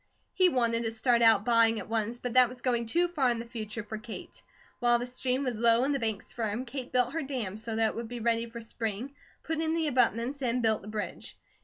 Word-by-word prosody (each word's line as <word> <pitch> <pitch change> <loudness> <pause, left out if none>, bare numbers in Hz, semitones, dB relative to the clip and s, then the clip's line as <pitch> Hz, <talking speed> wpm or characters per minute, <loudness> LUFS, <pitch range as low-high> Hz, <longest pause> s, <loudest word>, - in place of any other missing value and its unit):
He 370 -1 +4
wanted 235 -5 +1
to 225 - -1
start 235 +1 +2
out 220 -3 +5
buying 230 -1 +4
at - - -7
once, 225 +1 -1
but 245 -1 -4
that 255 -1 +6
was 250 0 -11
going 235 -2 +1
too 345 +9 +2
far 295 -7 +1
in 240 - 0
the 230 - -5
future 225 -1 -6
for 215 +1 -6
Kate. 225 0 -9 0.4
While 240 -1 +4
the 240 - -3
stream 255 +2 -1
was 245 -5 -2
low, 230 +1 +4
and 285 +2 +1
the 275 - 0
banks 220 -2 -2
firm, 230 +2 -2
Kate 255 0 -6
built 250 +1 +2
her 325 - -1
dam, 250 -9 -4
so 220 +1 -5
that 220 0 +3
it - - -7
would 230 0 -4
be 245 0 -5
ready 230 0 0
for 235 0 -8
spring, 225 +3 -4 0.3
put 320 0 -2
in 320 0 0
the 330 -1 0
abutments, 250 0 +1
and 245 -1 0
built 220 -1 +2
the 200 - -12
bridge. 215 -1 -5
235 Hz, 250 wpm, -29 LUFS, 225-255 Hz, 0.4 s, that